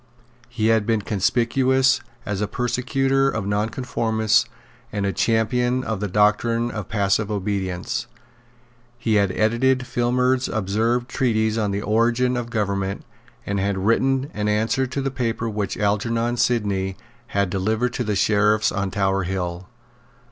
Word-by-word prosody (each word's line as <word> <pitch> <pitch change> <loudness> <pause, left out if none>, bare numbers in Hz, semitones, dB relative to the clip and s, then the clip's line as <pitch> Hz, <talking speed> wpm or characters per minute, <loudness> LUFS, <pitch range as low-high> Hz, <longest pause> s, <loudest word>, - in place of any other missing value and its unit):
He 110 -2 0
had 110 -2 +2
been 110 -3 +1
conspicuous 125 +5 +2 0.2
as 100 -1 -3
a 105 - 0
persecutor 135 +4 +1
of 110 -6 -3
nonconformists 110 +1 +1 0.5
and 100 -1 -2
a 100 - 0
champion 120 +4 +1
of 110 -5 -3
the 105 - -2
doctrine 105 +4 +2
of 105 -4 -6
passive 100 0 +1
obedience. 100 +3 -2 0.9
He 115 -2 -1
had 100 -2 +1
edited 125 +5 +2
Filmer's 125 +2 +1
absurd 110 +4 0
treatise 110 -5 0
on 110 -2 0
the 100 +1 -2
origin 115 +4 +2
of 120 -1 -3
government, 100 -4 -2 0.4
and 100 0 -1
had 100 0 0
written 135 +4 +2
an 105 0 -2
answer 110 +5 +1
to 140 +2 -3
the 135 - -1
paper 115 -3 -2
which 105 -3 -3
Algernon 115 +3 0
Sidney 100 -6 0 0.3
had 100 -2 0
delivered 110 +6 0
to 125 - -2
the 105 -2 -1
Sheriffs 105 +2 +3
on 100 0 -2
Tower 95 0 0
Hill. 90 -1 -3
110 Hz, 140 wpm, -22 LUFS, 100-120 Hz, 0.9 s, Sheriffs